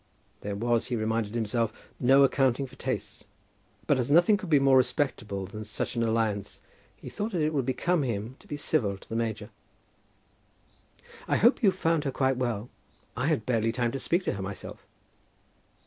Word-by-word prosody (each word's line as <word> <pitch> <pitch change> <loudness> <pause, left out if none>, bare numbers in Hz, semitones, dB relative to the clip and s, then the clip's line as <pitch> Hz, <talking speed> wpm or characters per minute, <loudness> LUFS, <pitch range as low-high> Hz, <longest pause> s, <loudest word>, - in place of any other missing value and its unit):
There 100 0 -4
was, 120 +3 0
he 125 - -1
reminded 110 -1 -1
himself, 115 0 0 0.3
no 135 +2 +6
accounting 135 -1 +2
for 130 0 -14
tastes; - - -4 0.6
but 140 - +2
as 125 - -1
nothing 175 +7 +6
could 195 -3 -6
be 150 - +6
more 135 -1 +4
respectable 125 -7 0
than 105 +3 -7
such 105 +4 -4
an 120 - 0
alliance, 110 -3 -1 0.4
he - - -12
thought 210 +1 -4
that 175 - 0
it 155 +1 0
would 135 -4 0
become 170 +6 +1
him 115 -1 -3
to 205 - -19
be 145 -5 -4
civil 110 -10 0
to - - -18
the 115 - -5
major. 115 -2 -2 1.8
"I - - +2
hope 235 +7 +4
you 210 - +6
found 165 -4 0
her 135 - 0
quite 130 -1 +1
well. 120 -3 -2 0.5
I 125 - -1
had 150 -10 0
barely 115 -2 +1
time 120 0 -1
to 135 - -4
speak 175 +6 0
to - - -1
her 100 - -5
myself." 95 0 -7
125 Hz, 185 wpm, -28 LUFS, 110-145 Hz, 1.8 s, no